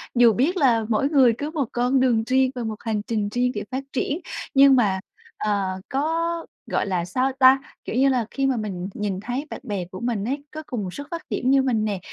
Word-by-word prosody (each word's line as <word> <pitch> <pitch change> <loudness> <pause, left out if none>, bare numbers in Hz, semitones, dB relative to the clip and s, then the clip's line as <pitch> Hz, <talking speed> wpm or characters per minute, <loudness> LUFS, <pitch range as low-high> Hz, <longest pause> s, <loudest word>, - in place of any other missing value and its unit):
Dù 235 -2 +6
biết 315 - +1
là 235 -7 +3
mỗi 255 +6 +2
người 265 -6 +5
cứ 295 +3 -4
một 285 -7 -2
con 250 +2 +2
đường 240 -4 +3
riêng 260 0 +3
và 245 - -3
một 220 -1 -3
hành 220 -2 0
trình 210 -3 -1
riêng 250 +3 +1
để 205 - -2
phát 260 +1 -3
triển, 285 +5 -1 0.3
nhưng 275 0 +7
mà, 205 -6 +2 0.4
ờ, 205 -2 0 0.2
có 330 +4 -1 0.3
gọi - - +1
là 180 -3 -1
sao 255 +9 0
ta? 260 0 +7 0.3
Kiểu - - -4
như 270 +2 +4
là 250 -4 +1
khi 275 - -1
mà 265 -2 +1
mình 190 -4 -4
nhìn 200 -3 -3
thấy 245 +7 -4
bạn - - -6
bè 205 -7 -3
của 185 +1 -9
mình 235 -4 -2
ấy, 280 +4 -3
có 310 0 -7
cùng 235 -5 -3
một 180 -1 -5
xuất 285 0 -7
phát 335 -1 -4
điểm 250 - -1
như 275 - +5
mình 230 -5 +1
nè, 200 -3 -2
245 Hz, 235 wpm, -23 LUFS, 215-275 Hz, 0.4 s, nhưng